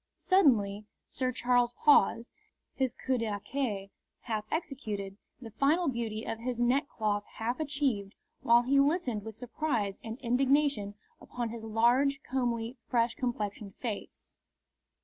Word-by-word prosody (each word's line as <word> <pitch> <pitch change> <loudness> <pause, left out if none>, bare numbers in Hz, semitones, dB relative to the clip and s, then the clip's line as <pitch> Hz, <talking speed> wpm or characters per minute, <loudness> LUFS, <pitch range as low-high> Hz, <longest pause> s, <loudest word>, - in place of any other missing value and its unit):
Suddenly 215 - +3 0.2
Sir 255 -1 -1
Charles 245 -1 +2
paused, 235 -4 +4 0.5
his 260 -3 -1
coup 260 -1 -1
d'archet 210 -1 -3 0.3
half 215 -3 -3
executed, 215 - -3 0.2
the 230 -3 -9
final 295 - +2
beauty 230 -3 -3
of 225 0 -4
his 240 0 -3
neck 260 +5 +2
cloth 205 -2 -1
half 235 +4 -2
achieved, 275 -10 -1 0.3
while 235 +1 +5
he 275 +3 +3
listened 275 - +1
with 220 -1 -8
surprise 240 -4 -2
and 225 +1 -6
indignation 260 -4 +2 0.3
upon 240 -2 -4
his 225 0 -7
large, 245 +6 +3
comely, 240 -1 -2
fresh 235 -1 +2
complexioned 210 -5 -4
face. 225 -5 -6
240 Hz, 130 wpm, -30 LUFS, 215-270 Hz, 0.5 s, while